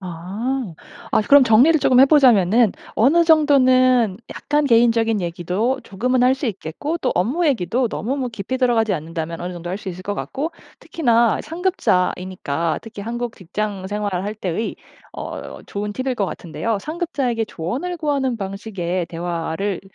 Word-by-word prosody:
아. 195 +6 -4 0.4
아 - - +3
그럼 280 +5 +6
정리를 255 +7 +5
조금 255 - +4
해보자면은 245 - +5 0.2
어느 300 +10 +4
정도는 255 - +4
약간 295 +1 -1
개인적인 230 -3 +3
얘기도 180 +9 -1
조금은 250 +6 0
할 255 +1 +5
수 275 - -2
있겠고 220 - -4
또 260 - -1
업무 255 - +1
얘기도 240 - 0
너무 245 +5 -3
뭐 260 -3 -2
깊이 230 +3 -4
들어가지 235 -4 +2
않는다면 165 0 -4
어느 180 +1 -4
정도 175 0 -7
할 185 - -2
수 205 - -7
있을 185 0 -7
거 205 - -2
같고. 295 +9 -4 0.3
특히나 235 -7 +1
상급자이니까 180 - -1
특히 220 -3 -9
한국 235 +1 -4
직장 195 +1 -4
생활을 205 -3 -2
할 210 +1 -3
때의 200 +2 -3 0.4
어 - - -7
좋은 205 +1 -4
팁일 260 +3 -2
것 205 -5 -1
같은데요. 200 +6 -3
상급자에게 280 - -2
조언을 255 - -4
구하는 280 -6 -1
방식의 190 -4 -4
대화를 170 +3 -3
225 Hz, 345 characters per minute, -21 LUFS, 185-260 Hz, 0.4 s, 그럼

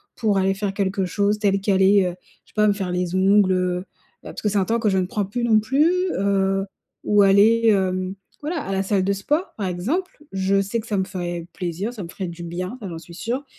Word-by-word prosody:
pour 210 -4 +1
aller 190 0 +1
faire 200 0 -2
quelque 195 -1 -1
chose 205 +3 0
tel 195 -2 +1
qu'aller, 195 0 +4
heu, 175 -1 -3 0.3
je - - -26
sais - - -26
pas, 210 -1 +4
me 205 - +4
faire 195 -3 -3
les 180 -1 -2
ongles, 190 +1 +4
heu, 180 -1 0 0.4
bah, - - -8
parce - - -8
que 210 - +1
c'est 205 - 0
un 195 - +2
temps 230 +3 0
que 220 -2 +1
je 190 - +1
ne 185 - +1
prends 200 +2 -2
plus 235 +5 -4
non 225 -2 +4
plus, 270 +9 +2 0.3
heu, 195 0 +1 0.4
ou 205 0 +4
aller, 205 +4 +5
hem, 185 -2 +1 0.3
voilà, 310 +2 -3
à 195 - -4
la 195 0 0
salle 195 -1 +1
de 200 - +2
sport 295 - -1
par 200 -3 -2
exemple. 265 - -2 0.2
Je 195 +1 +2
sais 210 +4 -2
que - - -14
ça 205 - -1
me 190 - +1
ferait 175 -2 -5
plaisir, 185 +6 -4
ça 210 -5 -7
me 170 - -8
ferait 185 +1 -5
du 170 0 -8
bien, 180 +7 -5
ça 200 - -5
j'en 165 - -6
suis 170 +1 -13
sûre 245 +9 -3
195 Hz, 250 wpm, -22 LUFS, 185-210 Hz, 0.4 s, aller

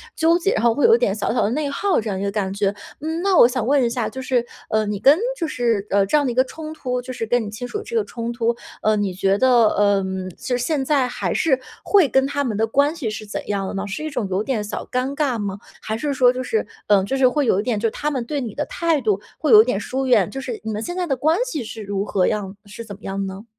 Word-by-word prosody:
纠 330 +2 +3
结， 375 +3 0
然 220 - -1
后 235 -1 +4
会 290 - +2
有 455 0 +7
一 - - +3
点 - - +1
小 - - -1
小 - - +1
的 205 - +1
内 290 +3 -1
耗 380 +5 +1
这 220 -1 -4
样 190 - -2
一 195 - -3
个 200 - 0
感 195 -2 -2
觉。 200 0 0 0.3
嗯， 320 +3 -3
那 385 -3 +3
我 - - +8
想 245 -2 -2
问 275 0 +3
一 235 - +2
下， 235 -1 -2
就 260 - -7
是， 250 -2 0 0.2
呃， 215 0 +1
你 205 -1 -3
跟 280 +7 +6 0.2
就 330 - -2
是 235 -8 0
呃， 200 0 +3
这 205 - 0
样 290 - +2
的 250 - 0
一 - - -6
个 255 - +5
冲 310 +2 -8
突 250 -5 -3
就 255 +1 -7
是 230 - -4
跟 240 +1 +1
你 205 - -5
亲 230 +4 -6
属 420 - -4
这 470 - -7
个 445 - +2
冲 235 0 -5
突， 235 0 0 0.3
呃， 215 0 +3
你 205 -2 -1
觉 195 +2 +1
得 245 -4 +5
嗯， 190 -2 +1
就 250 - -2
是 245 - -2
现 285 0 0
在 275 -3 +2
还 245 - -2
是 315 -8 +2 0.2
会 390 -7 +4
跟 265 0 +2
他 285 0 -1
们 225 -5 -2
的 225 +1 +1
关 285 +6 +2
系 255 -9 -3
是 215 0 -6
怎 205 - -6
样 195 -2 -1
的 - - -5
呢？ 195 +1 -3
是 200 +10 -5
一 310 - -3
种 245 -8 -2
有 190 +3 0
点 230 -5 -1
小 210 - -5
尴 255 +3 -1
尬 275 -6 0
吗？ 200 -1 -3 0.2
还 220 0 -3
是 290 +4 -2
说 250 -2 +5
就 255 0 -4
是， 445 - -1 0.2
嗯 200 -2 +4
就 270 +5 -1
是 260 -1 +5
会 290 +2 +1
有 195 - +3
一 - - -1
点 230 -4 -1
就 225 - +1
是 - - -3
他 300 +6 -2
们 255 -4 -2
对 290 +3 -2
你 230 -5 -5
的 295 - -2
态 330 -4 0
度 210 -4 +1 0.2
会 305 - +1
有 215 -1 +10
点 235 -4 -1
疏 265 +5 -3
远？ 225 -7 +3
就 270 - -6
是 250 -4 -5
你 220 - -3
们 210 +1 -3
现 350 - -5
在 360 -1 -2
的 270 - +1
关 315 +6 +2
系 305 - -4
是 220 0 -8
如 200 0 -3
何 190 -4 +1
样 200 -2 -2
是 210 +3 -9
怎 205 -2 -8
么 205 - -21
样 195 0 -3
呢？ 195 +3 -7
245 Hz, 325 characters per minute, -21 LUFS, 210-285 Hz, 0.3 s, 有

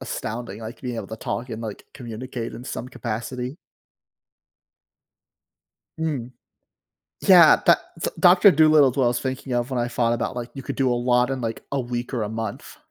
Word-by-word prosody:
astounding, 110 -1 -5
like, 110 +2 -8
being 125 -2 -4
able - - -5
to 110 - -6
talk, 120 +3 -4
and, 110 0 -5
like, 110 -2 -7
communicate 120 -2 -6
in 125 - -9
some 125 - -5
capacity. 125 +3 -5 2.4
Mm. 140 -7 -2 0.9
Yeah, 175 -5 +8
tha 170 - +4 0.2
so, - - -1
Doctor 180 +3 +7
Dolittle 155 -4 +5
is - - -11
what 135 - +3
I - - +4
was 120 0 -1
thinking 130 0 -4
of 120 +1 -1
when 130 - -1
I 120 0 0
thought 120 -1 +1
about, 120 +1 -2
like, 120 0 -5
you 135 - -7
could - - -5
do 130 -2 +2
a - - +1
lot 125 +1 +2
in, 135 -1 -2
like, 115 -1 -4
a 140 - +1
week 120 +1 -4
or 115 - -1
a 105 - -2
month. 110 -1 -6
125 Hz, 190 wpm, -23 LUFS, 115-135 Hz, 2.4 s, Yeah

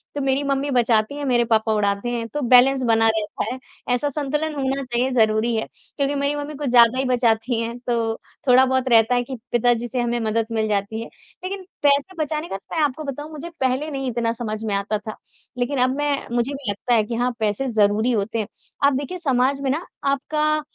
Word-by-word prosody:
तो 290 - -2
मेरी 270 +1 +1
मम्मी 280 0 -1
बचाती 235 0 +2
हैं, 290 - -4
मेरे 240 -3 +2
पापा 220 -1 +2
उड़ाते 205 +2 0
हैं, 235 -1 -3
तो 295 +5 -4
बैलेंस 255 +1 +5
बना 225 -1 +3
रहता 220 -2 -1
है। - - -6 0.4
ऐसा 290 +4 -1
संतुलन 300 +2 -2
होना 275 0 -1
चाहिए 250 +1 0
ज़रूरी 225 -1 +2
है 220 - -2 0.3
क्योंकि 280 0 0
मेरी 280 +1 0
मम्मी 290 +1 -5
कुछ 285 -1 -3
ज़्यादा 240 0 +6
ही 265 - 0
बचाती 240 -1 +1
हैं 230 +1 -4
तो 230 -2 0 0.3
थोड़ा-बहुत 260 +1 +4
रहता 230 +1 +5
है 245 - +1
कि 260 +1 -7
पिताजी 240 0 +2
से 245 +2 -3
हमें 240 0 -1
मदद 225 0 0
मिल 220 -1 0
जाती 210 +1 -1
है, 230 - -7 0.3
लेकिन 380 +1 -4 0.2
पैसे 285 +6 +2
बचाने 305 +2 -3
का 195 - -4
तो 195 - -10
मैं 320 - +2
आपको 295 +1 -1
बताऊँ 290 +2 -6
मुझे 310 +2 -7
पहले 265 +4 0
नहीं 270 -2 -3
इतना 230 -1 0
समझ 220 -2 -5
में 205 -2 0
आता 200 +2 -1
था, 215 +1 -8 0.4
लेकिन 250 +3 -1
अब 255 +1 +2
मैं 290 -1 +1 0.2
मुझे 240 +4 0
भी 275 -5 -5
लगता 225 +5 -1
है 225 -2 +4
कि 230 +2 -4
हाँ, 245 +2 +1
पैसे 215 +5 0
ज़रूरी 215 0 +2
होते 225 0 -1
हैं। 210 - -2 0.4
आप 280 0 +5
देखिए 285 +7 -3
समाज 275 -3 +1
में 275 - -1
ना 315 +6 -2 0.3
आपका 305 +2 0
250 Hz, 215 wpm, -22 LUFS, 225-280 Hz, 0.4 s, ज़्यादा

